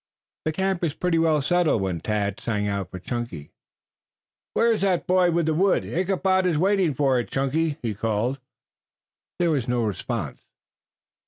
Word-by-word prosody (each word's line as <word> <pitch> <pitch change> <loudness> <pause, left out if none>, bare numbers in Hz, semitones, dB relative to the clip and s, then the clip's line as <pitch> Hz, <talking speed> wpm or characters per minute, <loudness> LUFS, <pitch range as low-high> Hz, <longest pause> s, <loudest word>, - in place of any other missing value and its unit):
The 155 - +1
camp 190 +2 -1
was 165 -3 -1
pretty 180 -2 +1
well 155 -3 +2
settled 170 - +2
when 90 -3 -2
Tad 100 +1 -2
sang 105 -3 -1
out 100 -3 -2
for 90 - -7
Chunky. 95 - -5 1.0
"Where 230 0 +4
is 225 - 0
that 190 -3 +1
boy 180 -1 +3
with 170 -1 +1
the 160 - +1
wood? 190 +5 +2
Ichabod 185 +1 +1
is 165 -4 +1
waiting 185 -3 +2
for 135 -2 +2
it. 120 - -4
Chunky!" 145 +3 0
he 115 -3 -1
called. 115 +5 -1 1.0
There 175 -1 +2
was 135 -5 0
no 120 -1 +1
response. 105 - -3
150 Hz, 165 wpm, -24 LUFS, 110-180 Hz, 1.0 s, Where